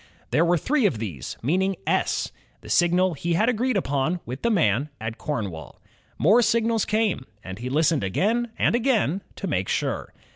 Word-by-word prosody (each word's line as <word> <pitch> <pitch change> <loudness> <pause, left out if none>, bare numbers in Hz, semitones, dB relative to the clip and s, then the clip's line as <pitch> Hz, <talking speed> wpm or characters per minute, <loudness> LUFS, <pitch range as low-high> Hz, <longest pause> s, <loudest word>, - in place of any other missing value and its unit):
There 160 - +4
were 175 +1 +3
three 265 - +2
of 130 - -2
these, 95 - -6
meaning 190 +8 +1
^*S," - - 0 0.3
the - - -12
signal 175 +1 +3
he 170 +3 -2
had 215 +7 +3
agreed 250 0 +1
upon 150 +1 0
with 125 +3 -6
the 235 - +1
man 140 - +2
at 110 +1 -5
Cornwall. 100 - -5 0.4
More 210 +10 +5
signals 230 -1 +2
came, 210 - 0 0.2
and 95 0 -7
he 125 +2 -4
listened 150 -1 +2
again 220 - 0
and - - +2
again 225 - +1
to - - -5
make - - -1
sure. - - -2
175 Hz, 175 wpm, -24 LUFS, -, 0.4 s, More